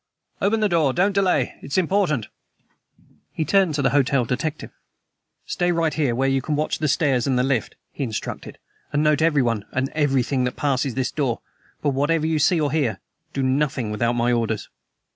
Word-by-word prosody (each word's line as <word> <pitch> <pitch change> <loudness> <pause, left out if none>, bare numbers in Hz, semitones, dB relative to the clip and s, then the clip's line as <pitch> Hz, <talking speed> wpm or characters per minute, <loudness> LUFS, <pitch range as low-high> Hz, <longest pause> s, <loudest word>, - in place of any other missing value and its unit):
"Open 220 +2 +2
the 210 - +4
door! 160 -7 +2
Don't 190 +3 +2
delay; 195 -2 +1
it 140 - -8
is - - +1
important." 175 - +1 1.1
He 160 - -2
turned 190 -2 +3
to 145 - 0
the - - +3
hotel 140 -3 +2
detective. 145 +6 -3 0.7
"Stay 175 0 0
right 165 -2 0
there 140 -7 +1
where 135 +2 +1
you 135 0 +1
can 150 +3 -2
watch 150 +1 -1
the 155 - 0
stairs 135 -4 +1
and 130 -2 +1
the 125 - +2
lift," 130 -4 -1 0.2
he 140 - -4
instructed; 110 -5 -5 0.3
"and 150 +1 +1
note 150 0 +3
everyone 130 -10 +2
and 130 +1 -1
everything 135 -3 +1
that 125 - -3
passes 135 -3 0
this 130 -1 -1
door. 135 -6 -1 0.4
But 145 - +2
whatever 150 +4 +1
you 160 -1 +1
see 165 +3 +3
or 145 -3 0
hear, 135 -10 0 0.3
do 135 - -2
nothing 130 -4 0
without 115 +3 0
my 120 0 +1
orders." 115 -3 -1
140 Hz, 190 wpm, -23 LUFS, 125-155 Hz, 1.1 s, the